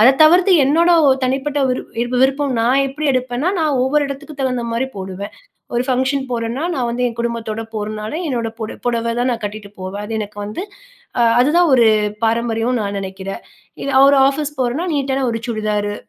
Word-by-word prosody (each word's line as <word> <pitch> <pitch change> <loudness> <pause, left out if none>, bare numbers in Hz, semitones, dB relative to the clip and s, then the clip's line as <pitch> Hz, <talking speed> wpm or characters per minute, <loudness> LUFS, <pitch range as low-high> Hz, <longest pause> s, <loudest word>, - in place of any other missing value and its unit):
அத 225 - +8
தவிர்த்து 355 +4 +6
என்னோட 325 +6 +3 0.2
ஒ - - +6
தனிப்பட்ட 270 +3 -1
விரு 240 -1 -3
விருப்பம் 275 +1 +2
நான் 245 +4 +3
எப்டி 285 +3 -5
எடுப்பேனா, 255 +5 -1
நான் 305 -5 +1
ஒவ்வொரு 290 +3 +2
இடத்துக்கு 280 +2 -7
தகுந்த 250 -2 0
மாரி 245 +3 0
போடுவேன். 190 +1 -6 0.4
ஒரு 240 - +2
ஃபங்க்ஷன் 265 +1 0
போறேன்னா 235 +4 -2
நான் 245 -3 -1
வந்து 240 +1 -2
என் 230 - -9
குடும்பத்தோட 230 -2 -3
போறனால 215 +1 -4 0.2
என்னோட 235 -4 -1
புட 220 -1 -4
புடவை 235 -1 0
தான் 245 +1 +1
நான் 235 -1 -2
கட்டிட்டு 205 0 -6
போவேன். 190 +2 -5
அது 225 - -6
எனக்கு 210 -1 -6
வந்து 210 - -5 0.6
ஆ - - +5 0.2
அதுதான் 320 +6 +4
ஒரு 235 -3 +5 0.4
பாரம்பரியம்னு 230 +1 0
நான் 200 0 -3
நெனைக்கிறேன். 190 0 -6 0.4
இது 275 - -2 0.2
ஒரு 280 0 +5
ஆஃபீஸ் 295 +1 -2
போறேனா 255 +9 -1
நீட்டான 270 -1 0
ஒரு 230 0 -3
சுடிதாரு, 210 -2 -1
245 Hz, 175 wpm, -18 LUFS, 220-275 Hz, 0.6 s, அத